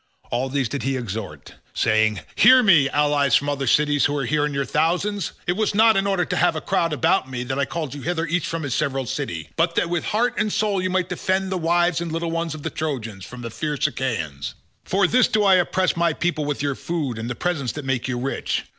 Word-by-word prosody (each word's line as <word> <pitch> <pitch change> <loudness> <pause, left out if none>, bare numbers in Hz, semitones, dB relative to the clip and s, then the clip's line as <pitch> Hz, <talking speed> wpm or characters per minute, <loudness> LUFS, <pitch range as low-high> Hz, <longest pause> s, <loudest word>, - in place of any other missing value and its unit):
All 125 +2 -1
these 135 -2 0
did 140 +4 -4
he 135 0 -1
exhort 110 -4 -6 0.2
saying, 110 -3 +2
"Hear 255 0 +7
me, 160 - +5
allies 145 -2 +2
from 145 - +2
other 140 -2 -2
cities 145 +2 +3
who 145 0 0
are 135 - -1
here 150 +4 +1
in 150 - -5
your 140 0 0
thousands, 180 +7 0
it - - +1
was 215 0 0
not 220 +1 +5
in 195 0 +1
order 195 -3 +1
to - - -3
have - - +3
a - - -1
crowd 170 -1 0
about 140 -3 +1
me 125 -1 -4
that 130 +2 -3
I 140 - +2
called 155 -4 -4
you 145 - -7
hither 165 +2 -1
each 170 0 -1
from 165 -1 -3
his 140 -4 -2
several 135 -3 -1
city, 80 -8 -4
but 170 +1 +1
that 170 - 0
with 175 -2 -1
heart 235 +3 +1
and 210 0 0
soul 205 -3 0
you 185 - -1
might 185 -1 0
defend 190 0 -1
the 190 - 0
wives 175 0 +2
and 170 -1 -4
little 165 +1 -2
ones 165 -1 -2
of 150 - -10
the - - -3
Trojans 115 -11 -4
from 125 0 -10
the 115 - -5
fierce 150 +3 -2
Achaeans. 80 - -3 0.3
For 195 +1 +2
this 250 +7 +4
do 215 -1 +1
I 195 -1 +5
oppress 185 +1 +1
my 170 -1 +2
people 155 -2 -1
with 145 -1 -2
your 140 -1 0
food 140 -6 -3
and 115 +2 -4
the 120 - -3
presents 140 -6 -2
that 150 -2 -7
make 130 -2 -1
you 125 -1 -2
rich. 130 +3 -2
150 Hz, 245 wpm, -22 LUFS, 130-175 Hz, 0.3 s, Hear